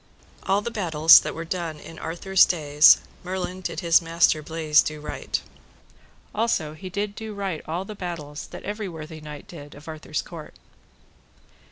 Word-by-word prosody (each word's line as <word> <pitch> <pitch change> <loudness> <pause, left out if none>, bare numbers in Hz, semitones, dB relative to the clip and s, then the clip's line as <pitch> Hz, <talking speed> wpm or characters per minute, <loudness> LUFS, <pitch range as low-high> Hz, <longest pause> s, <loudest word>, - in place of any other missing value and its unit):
All 200 +2 +1
the 235 - -3
battles 165 -7 +7
that - - -5
were 165 +1 -5
done 165 -3 -4
in 165 +1 -11
Arthur's 190 +3 +3
days 150 -3 +5 0.2
Merlin 185 0 -4
did 170 -3 -4
his 170 0 +5
master 165 -1 +2
Bleise 155 -1 +3
do 155 0 -4
write; 150 - -4 0.9
also 205 -9 0
he 170 +4 -8
did 205 +2 -3
do 220 0 -7
write 195 -5 -3
all 170 +4 -3
the 215 - -7
battles 165 -6 -6
that - - -10
every 210 -1 -4
worthy 160 -1 -9
knight 150 -1 -9
did 145 -4 -11
of 145 +2 -14
Arthur's 155 -1 -4
court. 165 -3 -10
165 Hz, 165 wpm, -24 LUFS, 155-190 Hz, 0.9 s, battles